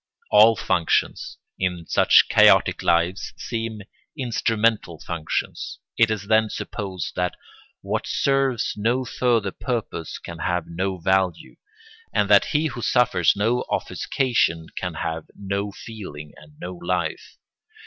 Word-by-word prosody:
All 110 +2 +7
functions, 85 -4 0 0.2
in 90 -2 -2
such - - +5
chaotic - - +5
lives, 85 +3 +1
seem 115 -2 -4 0.3
instrumental 115 - 0
functions. 85 -3 -4 0.2
It 115 -1 +4
is 105 -2 -2
then 110 +1 +3
supposed 95 -7 -5
that 90 0 -1 0.5
what - - -3
serves 135 -4 +1
no 120 +5 0
further 115 -5 +1
purpose 115 -10 -4
can 85 -1 -9
have 90 0 -1
no 95 +3 -3
value, 95 0 0 0.6
and - - +1
that - - +7
he 150 +1 0
who 135 -6 -4
suffers 120 -9 +3
no 115 +5 +1
offuscation 85 -11 0
can 90 -3 -4
have 80 -1 -3
no 100 +1 -3
feeling 95 -10 -9
and 75 +2 -17
no 90 +1 -6
life. 85 -2 -3
100 Hz, 125 wpm, -23 LUFS, 85-115 Hz, 0.6 s, All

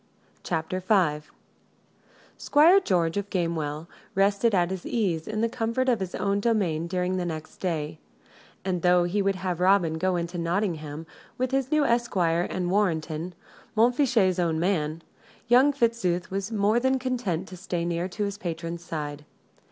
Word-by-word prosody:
CHAPTER 170 +1 -2
V 180 -6 +1 1.1
Squire 330 +7 +5
George 175 - 0
of 200 0 -3
Gamewell 160 -4 -2 0.3
rested 200 +3 +3
at 175 0 +2
his 190 -2 -4
ease 180 -9 -1
in 215 0 -2
the 230 - +3
comfort 230 +2 -1
of 235 -3 +2
his 190 -2 -4
own 200 0 0
domain 195 -8 0
during 180 +1 -1
the 180 - -1
next 160 -2 -6
day; 155 -4 -3 0.7
and, 180 -2 -1
though 180 0 +4
he 185 +4 0
would 195 0 +1
have 185 -2 -3
Robin 180 -4 +3
go 185 +1 +1
into 170 +1 -3
Nottingham, 165 -4 -2 0.3
with 255 0 -1
his 270 0 0
new 305 -1 +3
esquire 180 -9 +1
and 180 -1 -2
Warrenton 170 -3 -1 0.4
Montfichet's 230 -6 +3
own 165 -2 +1
man 165 -3 -1 0.4
young 255 +4 +6
Fitzooth 230 -10 0
was 195 +2 -3
more 215 +2 +2
than 260 +1 +2
content 240 -9 -2
to 185 - -8
stay 175 -2 -3
near 170 +1 -1
to 210 +3 -3
his 200 0 -3
patron's 170 0 -5
side. 150 -3 -5
185 Hz, 160 wpm, -26 LUFS, 170-215 Hz, 1.1 s, young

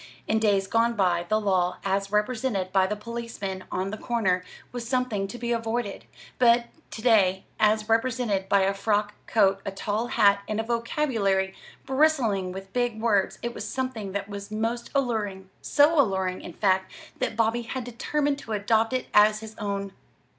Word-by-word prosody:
In 220 - +2
days 200 -3 +2
gone 230 +3 +2
by, 175 -4 +1
the 215 - +3
law, 185 -4 +1
as 195 0 0
represented 210 -3 0
by 190 0 +3
the 210 - -2
policeman 210 -4 -6
on 190 +2 -2
the 215 - -6
corner, 195 -7 0 0.3
was 240 -1 -6
something 250 -7 0
to 200 - -8
be 240 0 -3
avoided; 230 -2 -2 0.3
but 235 -1 +5 0.2
to 220 - -8
day, 195 -5 +4 0.2
as 215 0 +3
represented 225 -4 0
by 200 - +4
a 195 +1 +2
frock 205 +1 0
coat, 195 -3 +3
a - - -3
tall 205 +4 -2
hat, 200 -3 +4
and 215 0 -2
a - - 0
vocabulary 225 -5 0 0.3
bristling 260 -10 +2
with 195 +1 -9
big 245 -3 0
words, 210 -4 +1
it 235 0 -2
was - - -6
something 255 -7 -3
that 200 0 -3
was 200 0 -7
most 225 +3 -2
alluring 205 -8 -1
so 295 +1 +4
alluring, 190 -5 -1
in 175 - -9
fact, 190 0 +1 0.3
that 225 - -2
Bobby 230 +1 +2
had 250 +2 -5
determined 280 +4 -1
to 225 - -6
adopt 220 +3 +1
it 255 - -1
as 210 +1 +5
his 220 0 -9
own. 200 -2 -3
215 Hz, 175 wpm, -26 LUFS, 195-235 Hz, 0.3 s, but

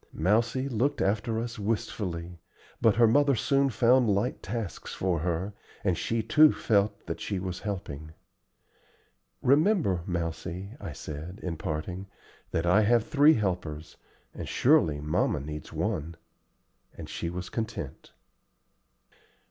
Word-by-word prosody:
Mousie 115 - +1
looked 130 +2 0
after 105 +3 0
us 115 +1 -5
wistfully, 90 -5 -3 0.4
but 115 -3 +5
her 120 0 +6
mother 140 +4 +4
soon 140 +4 +2
found 120 +1 +4
light 105 +6 0
tasks 110 -4 -5
for 90 -3 0
her, 90 +4 -2 0.3
and 95 -4 +2
she 115 +6 -1
too 150 +7 +6
felt 100 -1 +1
that 80 - -4
she 100 - -2
was 90 -1 -4
helping. 80 -7 -5 1.3
"Remember, 145 - +3
Mousie," 90 +2 -3
I - - -6
said, 80 +7 -7
in 85 -2 -2
parting, 90 +5 -4 0.4
"that 80 - -1
I 90 +5 +5
have 115 +1 +3
three 150 +1 +5
helpers, 85 -7 -3 0.4
and - - -6
surely 75 -2 +3
mamma 75 0 0
needs 75 +2 -7
one;" 80 +2 -2 0.8
and - - -7
she 85 - -4
was 90 +1 -6
content. 110 -2 -5
100 Hz, 130 wpm, -28 LUFS, 85-115 Hz, 1.3 s, her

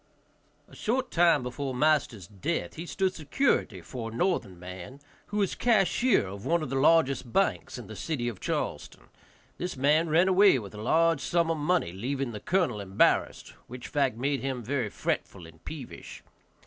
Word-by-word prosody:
A - - -16
short 255 +3 -1
time 170 -5 +4
before 130 +1 -4
master's 140 - +1
death 105 - -3
he 165 +2 -7
stood 190 0 0
security 155 - 0
for 115 +4 -6
a 115 - -9
northern 125 - -1
man, 90 +9 -9 0.3
who 210 - -4
was 200 -3 +1
cashier 235 - +2
of 100 +1 -8
one 170 -1 +1
of 135 - -5
the - - -1
largest 135 -4 +3
banks - - 0
in - - -8
the - - -9
city 135 -7 -3
of 115 -6 -5
Charleston. - - -4 0.5
This 180 -5 -4
man 150 +5 +3
ran 170 +4 +4
away 190 -4 +6
with 105 -5 -7
a 105 - -8
large 165 +5 +2
sum 170 +4 +1
of 165 - -1
money, 155 - +1
leaving 130 +6 -3
the 105 - -6
colonel 170 - 0
embarassed, 95 0 +1 0.2
which 125 0 -9
fact 135 -6 0
made 140 +2 0
him 130 -3 -3
very 125 -2 -1
fretful 95 -2 -3
and 80 -1 -16
peevish. 145 -6 -9
140 Hz, 175 wpm, -28 LUFS, 115-170 Hz, 0.5 s, away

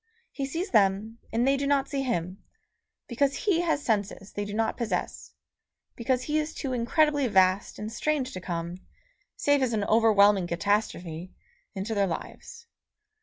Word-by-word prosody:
He 275 -1 -3
sees 335 +7 -4
them, 210 +1 +2
and 235 +3 +1
they 275 - +4
do 280 0 -1
not 280 -1 +2
see 275 -1 -2
him, 190 -7 -3 0.6
because 275 +3 +1
he 375 -5 +1
has 320 -4 0
senses 200 -3 -2
they 205 - -3
do 205 - -6
not 225 0 0
possess, 235 -3 -4 0.6
because 250 +1 0
he 305 +2 0
is 310 +1 -4
too 270 -3 -3
incredibly 285 +3 +2
vast 190 -2 +2
and 210 +1 -5
strange 275 +1 -1
to 185 - -6
come, 170 -1 -4 0.6
save 285 -1 +2
as 250 -3 +1
an 210 -2 0
overwhelming 205 -4 +4
catastrophe, 175 -2 -2 0.4
into 200 +4 -3
their 200 -2 +2
lives. 465 - -7
225 Hz, 160 wpm, -27 LUFS, 195-275 Hz, 0.6 s, they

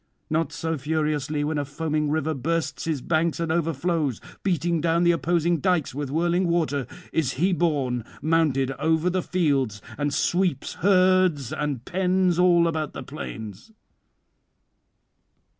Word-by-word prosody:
Not 160 -1 +1
so 160 -2 -3
furiously 150 0 -1
when 150 0 -1
a - - 0
foaming 150 +1 -2
river 160 +1 0
bursts 165 +4 -2
his 155 -5 -1
banks 165 0 +1
and 165 -1 -1
overflows, 160 -4 0 0.2
beating 170 -3 0
down 165 +1 +2
the 175 - +5
opposing 170 0 +1
dykes 175 -3 +1
with 145 0 -4
whirling 175 +4 +1
water, 155 -6 0 0.3
is 150 -5 +1
he 180 +7 +1
borne 140 -9 0 0.2
mounded 150 -4 +1
over 160 +3 +2
the 185 +1 0
fields, 140 - 0 0.2
and 145 0 0
sweeps 175 +4 0
herds 185 - +3
and 145 -5 -2
[499 185 0 +2
529]pens 170 - -3
all 175 -2 +5
about 155 -2 -2
the 135 - -6
plains. 110 - -8
160 Hz, 140 wpm, -25 LUFS, 145-175 Hz, 0.3 s, the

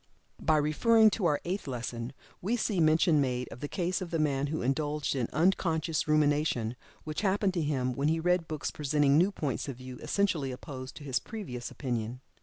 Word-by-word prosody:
By 155 - +3
referring 215 +9 +5
to 195 -5 +1
our 150 -3 +2
Eighth 185 +1 -3
Lesson, 120 -1 -4 0.3
we 225 +7 0
see 210 -4 0
mention 155 -1 +4
made 125 -2 -1
of - - -10
the 145 - -4
case 180 +3 -1
of 180 - -4
the 165 - -1
man 145 -2 +1
who 155 -1 -2
indulged 145 +2 0
in 125 -4 0
"unconscious 165 -1 +1
rumination," 145 -6 +2 0.3
which 155 +3 -4
happened 200 -1 +2
to 175 - 0
him 130 -4 0
when 140 +4 0
he 160 +1 +2
read 180 0 +1
books 155 -2 -3
presenting 145 -1 +2
new 180 +6 +4
points 150 -9 -3
of 135 - -4
view 130 0 -9
essentially 175 -10 0
opposed 130 0 -8
to 150 - -10
his 135 -3 0
previous 130 - -6
opinion. 120 -2 -3
150 Hz, 195 wpm, -30 LUFS, 130-175 Hz, 0.3 s, referring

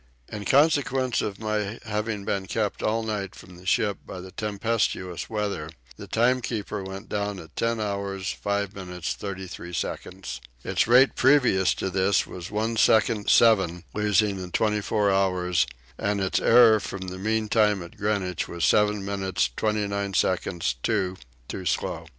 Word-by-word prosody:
In 105 -1 -6
consequence 135 -2 +3
of 100 -2 -3
my 105 0 -2
having 105 -1 -3
been 95 -1 -2
kept 105 +3 -2
all 115 +1 0
night 105 -3 -3
from 90 - -13
the 90 +1 -13
ship 100 +1 +1
by 90 - -8
the 95 +1 -9
tempestuous 105 -4 -2
weather 105 -8 -2 0.3
the - - -10
timekeeper 115 -4 0
went 95 +1 -7
down 100 -1 -2
at 80 -3 -12
10 115 0 0
hours 100 -2 -2
5 100 -1 -2
minutes 90 -2 -4
36 95 -3 -6
seconds. 90 +2 -5 0.2
Its - - +1
rate 125 +3 +6
previous 125 -8 +4
to 95 - -3
this 95 +2 +2
was 90 0 -8
1 110 +2 -1
second, 110 -1 +3
7 95 -7 +4
losing 105 -1 +2
in 90 - -7
24 105 0 +1
hours, 90 -2 +2 0.3
and 100 0 0
its 95 -1 +1
error 115 -2 +6
from 95 -2 -6
the 95 0 -7
mean 110 +2 0
time 105 -3 +2
at 85 - -12
Greenwich 100 -3 -1
was 85 -1 -1
7 105 -1 +3
minutes 95 -9 -1
29 100 -2 -1
seconds, 85 -8 0
2 95 - 0 0.3
too - - -5
slow. - - -2
100 Hz, 155 wpm, -26 LUFS, 95-110 Hz, 0.3 s, rate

